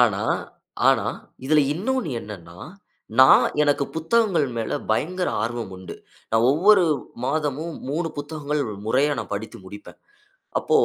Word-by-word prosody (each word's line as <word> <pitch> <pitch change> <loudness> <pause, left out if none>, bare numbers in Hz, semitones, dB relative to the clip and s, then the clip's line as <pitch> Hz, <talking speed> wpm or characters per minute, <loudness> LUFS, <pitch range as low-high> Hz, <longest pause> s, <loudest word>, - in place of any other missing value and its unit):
ஆனா - - +3 0.7
ஆனா - - +3 0.4
இதில 150 +3 +4
இன்னொன்னு 235 - -2
என்னன்னா, 90 -5 -10 0.6
நான் 130 - +8 0.2
எனக்கு 145 -1 +2
புத்தகங்கள் 180 -2 +2
மேல 115 -1 -2
பயங்கர 180 +10 0
ஆர்வம் 115 -3 -3
உண்டு. 95 0 -9 0.4
நான் 115 +2 +3
ஒவ்வொரு 185 +5 +5 0.4
மாதமும் 150 +3 -2 0.2
3 165 +3 -1
புத்தகங்கள் 150 0 -3 0.2
முறையா 140 +6 +2
நான் 115 - -5
படித்து 110 +2 -6
முடிப்பேன். 105 +2 -11 0.6
அப்போ - - +2
145 Hz, 120 wpm, -23 LUFS, 115-165 Hz, 0.7 s, நான்